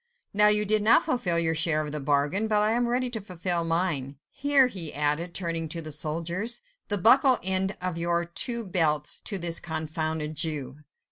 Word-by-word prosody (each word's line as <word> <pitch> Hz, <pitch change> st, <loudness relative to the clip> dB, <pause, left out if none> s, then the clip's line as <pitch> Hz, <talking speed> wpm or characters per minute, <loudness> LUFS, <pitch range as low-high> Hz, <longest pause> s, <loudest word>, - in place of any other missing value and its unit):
Now, 210 Hz, +1 st, +6 dB
you 210 Hz, 0 st, +5 dB
did 215 Hz, +1 st, +1 dB
not 215 Hz, +2 st, +5 dB
fulfil 180 Hz, -9 st, +1 dB
your 165 Hz, -1 st, +2 dB
share 155 Hz, -1 st, +1 dB
of 150 Hz, -, -6 dB
the 150 Hz, -, -4 dB
bargain, 145 Hz, +9 st, 0 dB
but 210 Hz, -1 st, +1 dB
I 210 Hz, +1 st, +1 dB
am 240 Hz, +1 st, 0 dB
ready 250 Hz, +1 st, 0 dB
to 225 Hz, -3 st, -5 dB
fulfil 180 Hz, -2 st, -1 dB
mine. 165 Hz, -5 st, -2 dB, 0.2 s
Here," 280 Hz, -1 st, +3 dB
he 180 Hz, -11 st, -1 dB
added, 150 Hz, +4 st, -2 dB
turning 165 Hz, -3 st, -3 dB
to 165 Hz, -, -4 dB
the 155 Hz, -1 st, -6 dB
soldiers, 170 Hz, +10 st, -3 dB, 0.2 s
"the 205 Hz, -, +1 dB
buckle 255 Hz, +6 st, +5 dB
end 190 Hz, +1 st, +1 dB
of 180 Hz, -2 st, -2 dB
your 170 Hz, 0 st, 0 dB
two 235 Hz, +7 st, -2 dB
belts 155 Hz, -5 st, 0 dB
to 200 Hz, -, -2 dB
this 170 Hz, -2 st, -1 dB
confounded 155 Hz, -1 st, -4 dB
Jew." 145 Hz, -4 st, -2 dB
170 Hz, 190 wpm, -26 LUFS, 155-210 Hz, 0.2 s, Now